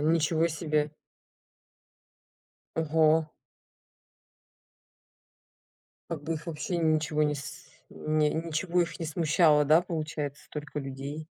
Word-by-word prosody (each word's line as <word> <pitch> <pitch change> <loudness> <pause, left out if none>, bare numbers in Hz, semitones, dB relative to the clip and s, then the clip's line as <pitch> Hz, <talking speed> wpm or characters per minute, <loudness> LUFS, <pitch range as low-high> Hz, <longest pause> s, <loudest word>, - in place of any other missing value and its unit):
ничего 160 +1 +2
себе. 155 -2 0 1.9
Ого. 160 0 +3 2.8
Как 155 -3 -4
бы 165 +2 -2
их 155 +2 -7
вообще 165 +2 -3
ничего 155 -2 +1
не 150 0 +2
с 140 -3 -8 0.3
н 155 0 -2
ничего 165 +3 +1
их 170 0 -5
не 165 - -3
смущало, 155 -1 +4
да, 155 +4 +6
получается, 155 -4 -4
столько 150 0 -6
людей? 140 +3 -6
155 Hz, 100 wpm, -29 LUFS, 150-165 Hz, 2.8 s, да